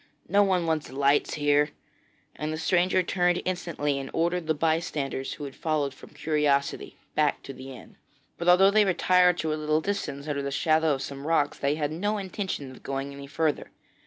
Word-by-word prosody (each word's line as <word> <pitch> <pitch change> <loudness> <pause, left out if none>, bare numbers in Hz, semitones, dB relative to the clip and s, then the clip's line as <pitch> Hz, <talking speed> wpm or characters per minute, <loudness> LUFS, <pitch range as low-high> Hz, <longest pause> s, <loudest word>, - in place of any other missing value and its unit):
'No 200 +3 +4
one 185 -4 +2
wants 160 -5 -1
lights 140 +2 +2
here,' 145 0 +3 0.7
and 150 +1 -3
the 155 - -3
stranger 180 +3 +2
turned 180 0 +1
instantly 165 -6 -1
and 135 -1 -6
ordered 170 0 0
the 160 - +2
bystanders 155 -4 -1
who 150 - -8
had 140 -2 -6
followed 150 -4 -1
from - - -14
curiosity, 150 -2 0 0.2
back 150 -1 +1
to 135 - -8
the 130 +1 -10
inn. 130 - -13 0.4
But 170 +1 +1
although 190 +2 +7
they 215 +1 +5
retired 180 -1 +4
to 160 -2 -1
a 155 - -4
little 155 0 +2
distance, 155 -6 -3
under 145 -2 -1
the 140 - -3
shadow 155 +2 +2
of 135 - -5
some 140 +1 -7
rocks, 150 -3 +1
they 140 +1 +1
had 150 -1 -2
no 205 +7 -1
intention 190 -8 -4
of 130 - -14
going 135 +1 -4
any 140 0 -9
further. 155 +1 -1
155 Hz, 190 wpm, -27 LUFS, 140-175 Hz, 0.7 s, although